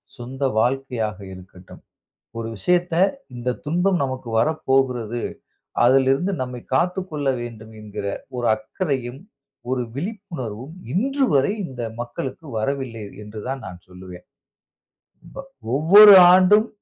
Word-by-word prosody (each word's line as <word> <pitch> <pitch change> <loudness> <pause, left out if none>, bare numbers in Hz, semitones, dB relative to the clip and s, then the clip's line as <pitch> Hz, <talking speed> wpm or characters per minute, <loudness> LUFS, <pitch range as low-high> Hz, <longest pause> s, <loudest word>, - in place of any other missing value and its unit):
சொந்த 130 +3 -9 0.2
வாழ்க்கையாக 125 -4 -1 0.2
இருக்கட்டும். 90 0 -14 0.6
ஒரு 115 0 -4
விஷயத்த 175 - +1 0.4
இந்த 120 +1 -3
துன்பம் 175 +4 +1
நமக்கு 130 -2 -5
வரப்போகிறது, 125 -5 0 0.6
அதிலிருந்து 135 +8 +3
நம்மை 125 -1 -6
காத்துக் 180 +5 0
கொள்ள 145 -3 -2
வேண்டும் 110 -2 -9
என்கிற 105 -1 -7 0.3
ஒரு 120 -1 -2
அக்கறையும், 130 - -4 0.5
ஒரு 130 -1 0
விழிப்புணர்வும் 155 - -6 0.2
இன்றுவரை 235 - +1
இந்த 125 -2 -7 0.2
மக்களுக்கு 130 +5 -7
வரவில்லை 120 -3 -3 0.2
என்று 105 0 -9
தான் 135 0 -4
நான் 90 -1 -11
சொல்லுவேன். 90 -1 -12 1.1
ப - - -11 0.4
ஒவ்வொரு 200 +7 +9 0.2
ஆண்டும் 205 +4 +5
130 Hz, 105 wpm, -22 LUFS, 115-170 Hz, 1.1 s, ஒவ்வொரு